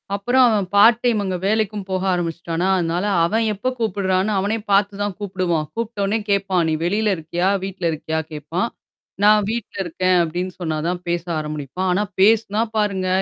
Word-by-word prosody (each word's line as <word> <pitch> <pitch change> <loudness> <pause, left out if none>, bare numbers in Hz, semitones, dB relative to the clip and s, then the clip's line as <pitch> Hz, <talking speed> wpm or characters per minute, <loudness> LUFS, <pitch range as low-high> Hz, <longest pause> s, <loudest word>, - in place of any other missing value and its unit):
அப்புறம் 245 +6 +3
அவன் 210 -4 +1
part 225 +3 +7
time 235 -4 +2
அங்கே 185 -2 -2
வேலைக்கும் 210 -1 0
போக 185 0 -1
ஆரம்பிச்சுட்டானா, 170 0 -2
அதனால 175 +3 -1 0.2
அவன் 220 +6 +1
எப்போ 210 +5 -2
கூப்பிடுறான்னு 195 -2 0
அவனே 200 +4 0
பாத்து 200 +1 +3
தான் 205 -1 -1
கூப்பிடுவான். 185 -6 -1
கூப்பிட்ட 230 -2 -3
உடனே 210 +3 +1
கேட்பான், 195 -3 +1
நீ - - +1
வெளியில 210 +2 +1
இருக்கியா? 170 +4 -1
வீட்டுல 195 -2 -5
இருக்கியா? 160 +1 -3
கேட்பான் 155 +7 -2 0.6
நான் 210 0 +5
வீட்டில 230 -3 -4
இருக்கேன் 185 +2 +1
அப்படின்னு 175 +3 -3
சொன்னாதான் 165 +2 -2
பேச 170 -1 -1 0.2
ஆரம்பிப்பான் 155 +4 -3
ஆனா 200 +3 +1 0.2
பேசுனா 215 +1 +3 0.2
பாருங்க, 195 -3 0
190 Hz, 160 wpm, -21 LUFS, 175-210 Hz, 0.6 s, part